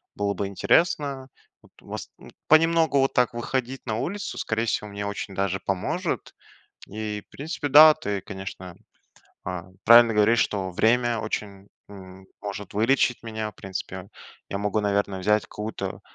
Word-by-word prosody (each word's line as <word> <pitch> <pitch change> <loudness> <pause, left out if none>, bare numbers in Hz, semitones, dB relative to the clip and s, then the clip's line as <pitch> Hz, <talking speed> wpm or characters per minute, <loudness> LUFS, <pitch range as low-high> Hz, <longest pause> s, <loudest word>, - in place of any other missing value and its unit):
было 100 0 -1
бы 100 +1 -3
интересно. 135 - +1 0.3
Вот, - - -22
вас - - -7 0.4
Понемногу 160 -2 +4
вот 135 - +2
так 125 -2 +2
выходить 130 +2 -3
на 110 -2 -2
улицу, 200 - -4
скорее 115 0 -1
всего, 105 -2 -2
мне 100 0 -5
очень 100 -1 -5
даже 95 -1 -1
поможет. 95 -2 -2 0.5
И 105 0 -5
в - - -68
принципе 145 +1 -4
да, 155 +2 +9
ты, 105 -11 -3
конечно, 95 -2 -8 0.7
а, 90 -2 -4 0.2
правильно 115 0 +8
говоришь, 105 +3 +4
что 95 -2 -3
время 115 +3 +2
очень 100 -2 -5 0.2
м 95 -1 -12 0.2
может 100 -1 -6
вылечить 125 +3 +2
меня. 110 -1 -4
В - - -39
принципе 95 0 -7 0.4
я 100 - -3
могу, 105 +1 0
наверное, 100 -2 0
взять 105 +2 +2
какую-то 105 +1 -6
105 Hz, 150 wpm, -25 LUFS, 100-125 Hz, 0.7 s, да